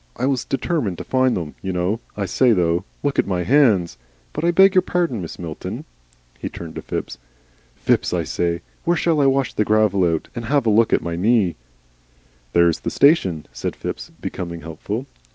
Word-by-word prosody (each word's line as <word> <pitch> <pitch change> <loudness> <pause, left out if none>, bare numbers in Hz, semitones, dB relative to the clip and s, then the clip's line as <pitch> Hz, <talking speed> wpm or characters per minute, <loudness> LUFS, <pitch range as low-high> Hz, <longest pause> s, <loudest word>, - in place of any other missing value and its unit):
I 125 - -1
was 135 -2 0
determined 135 - -1
to - - -6
find 130 -1 +2
them, 80 -4 -5
you 95 - -3
know. 90 +5 -1 0.2
I 100 - -1
say 125 +5 +3
though 85 -1 +1 0.2
Look 145 -1 0
at - - +2
my 90 -2 0
hands! 110 - +3 0.3
But - - -4
I 170 - +3
beg 190 +2 +6
your 185 - +5
pardon, 170 - -1
Mrs. 85 - -7
Milton." 80 -3 -6 0.5
He - - -4
turned 85 -2 -8
to - - -6
Phipps. - - -5 0.6
"Phipps, - - +1
I - - 0
say, 85 -1 -1 0.2
where 175 0 +2
shall 160 -3 +2
I 140 - +4
wash 135 -1 +1
the 105 - +1
gravel 105 -3 +3
out? 80 - -2
And 120 -1 -5
have 140 +1 +1
a 110 - +3
look 110 +2 +4
at - - +2
my 85 0 -3
knee?" 100 -1 +2 1.0
"There's 85 -1 +4
the - - -3
station," 95 - +3
said - - -4
Phipps, - - -6
becoming 85 -2 -6
helpful. 80 0 -5
105 Hz, 195 wpm, -21 LUFS, 85-135 Hz, 1.0 s, beg